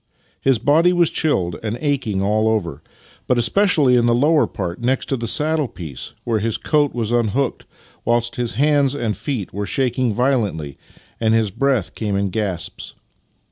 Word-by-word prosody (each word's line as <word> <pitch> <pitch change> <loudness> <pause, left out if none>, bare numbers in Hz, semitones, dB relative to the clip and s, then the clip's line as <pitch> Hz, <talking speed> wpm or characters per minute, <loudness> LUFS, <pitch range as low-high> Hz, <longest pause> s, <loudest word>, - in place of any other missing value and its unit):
His 135 -2 +3
body 155 +9 +3
was 175 -2 +3
chilled 95 - 0
and 110 +1 -3
aching 125 -10 -1
all 110 +2 +1
over, 85 -9 -1 0.5
but 125 - +2
especially 140 - +3
in 120 -1 +3
the 120 - +3
lower 150 +5 +3
part, 90 +1 -5
next 130 +2 0
the 120 -4 -2
saddle 155 +3 0
piece, 80 - -8
where 115 -2 0
his 110 +1 0
coat 145 -3 +1
was 115 -2 -2
unhooked, 120 +3 0 0.4
whilst 120 0 0
his 120 -2 -2
hands 145 -1 +2
and 115 -6 -2
feet 125 - -4
were 100 +1 -3
shaking 130 -2 0
violently 105 - -1 0.4
and 110 0 +2
his 110 -3 +1
breath 125 -6 0
came 105 -3 -2
in 100 -1 -1
gasps. 100 -5 -4
120 Hz, 165 wpm, -20 LUFS, 105-140 Hz, 0.5 s, His